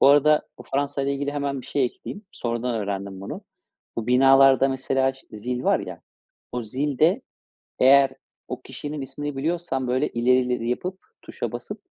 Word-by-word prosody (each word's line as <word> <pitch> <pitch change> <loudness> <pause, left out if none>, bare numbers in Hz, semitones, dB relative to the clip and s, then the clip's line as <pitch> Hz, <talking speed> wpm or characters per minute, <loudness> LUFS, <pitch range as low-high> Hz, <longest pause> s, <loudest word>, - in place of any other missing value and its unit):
Bu - - +6
arada 150 +2 +5 0.3
Fransa'yla 140 0 0
ilgili 140 +1 -2
hemen 140 -2 -2
bir - - -13
şey 140 - +1
ekleyeyim. 200 +10 -6
Sonradan 120 +1 -2
öğrendim 100 -2 -3
bunu. 100 - -6 0.6
Bu 115 - -3
binalarda, 135 +1 +6
mesela, 135 0 +1
ş 135 - -18
zil 125 +4 -4
var - - +4
ya. - - -7 0.5
O 125 -1 -3
zil 135 +5 -2
de 175 +10 +4 0.6
eğer 135 +1 +6 0.4
o - - -5
kişinin 150 0 -6
ismini 140 +2 -5
biliyorsan, 150 -3 -1
böyle, 125 +1 +1
ileri 120 +2 +3
ileri 125 -2 -1
yapıp 185 +9 -3 0.2
tuşa - - -5
basıp - - -6
135 Hz, 160 wpm, -24 LUFS, 125-145 Hz, 0.6 s, Bu